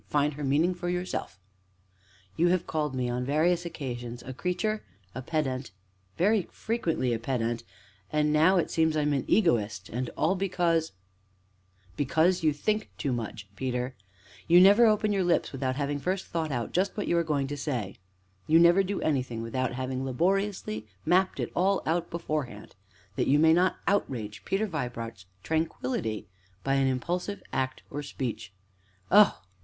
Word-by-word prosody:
Find 145 0 +1
her 145 +1 -6
meaning 150 +6 +2
for 175 0 -4
yourself." 180 - -3 1.0
"You 170 - +3
have 180 0 +2
called 150 -4 -2
me, 125 -1 -1
on 120 +1 -2
various 165 +6 +1
occasions, 120 -6 -6
a 130 - -7
'creature,' 210 - -1 0.3
a 130 - -5
'pedant' 130 -3 -2 0.5
very 200 +1 +2
frequently 165 - -1
a 115 - -1
'pedant,' 115 -1 -2 0.5
and 150 0 +2
now, 165 +5 +5
it 175 - 0
seems 160 -1 +2
I 150 - +2
am 150 0 +1
an 135 - -1
'egoist,' 110 - +2
and 125 +2 -3
all 165 +4 +2
because 175 -4 0 0.5
" 95 0 -34
"Because 160 +6 +2
you 155 -2 +3
think 210 +9 -1
too 135 - -1
much, 110 -3 -5
Peter; 125 +2 -2 0.5
you 170 +1 +7
never 205 +5 +7
open 215 0 +2
your 195 -2 +1
lips 175 -1 +1
without 130 -1 -2
having 145 0 -1
first 185 +5 -2
thought 160 -2 -2
out 120 -3 -2
just 190 +4 0
what 205 - -2
you - - +2
are 170 - +3
going 145 -4 0
to 145 +2 -4
say; 125 -9 -3 0.5
you 160 - +6
never 170 +3 +6
do 195 +1 -2
anything 130 -6 -1
without 130 +2 -2
having 130 +1 -3
laboriously 170 - -1 0.2
mapped 185 +1 +2
it - - -2
all 190 +3 +2
out 170 +1 0
beforehand, 150 -10 -4 0.4
that - - +1
you 140 - +5
may 160 +1 +6
not 180 +2 +3
outrage 115 - -1
Peter 195 +3 0
Vibart's 120 - -5 0.2
tranquillity 130 -9 -2 0.4
by 135 0 +1
any 135 -1 +3
impulsive 180 +9 -2
act 130 0 -2
or 145 - -3
speech. 125 -9 -5 0.6
Oh! 205 +1 +6
150 Hz, 165 wpm, -28 LUFS, 125-175 Hz, 1.0 s, you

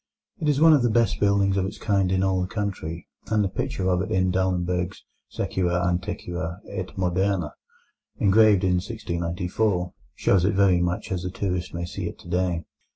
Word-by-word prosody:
It 150 - 0
is 145 -1 +2
one 160 0 +7
of 145 - +4
the 120 - +2
best 115 -3 +2
buildings 100 -1 +2
of 95 - +1
its 95 - -7
kind 100 -3 +1
in 95 0 +2
all 95 -1 +1
the 90 - -1
country, 95 -5 -4 0.2
and 110 -1 +2
the - - +1
picture 100 -2 -3
of 90 -1 +2
it 95 - -3
in 95 0 +2
Dahlenberg's 90 -1 -1 0.3
Suecia 90 -2 -1
antiqua 90 -1 -3
et - - -4
moderna, 90 -2 0 0.7
engraved 105 -1 +5
in 90 -1 +3
1694, 90 -1 -2 0.2
shows 95 -3 +2
it 100 +2 +2
very 95 -3 +4
much 90 +2 -2
as 90 -2 -1
the 90 - -3
tourist 90 -2 -3
may 85 0 -3
see 85 - -5
it - - -11
today. 90 -1 -1
95 Hz, 180 wpm, -25 LUFS, 90-100 Hz, 0.7 s, one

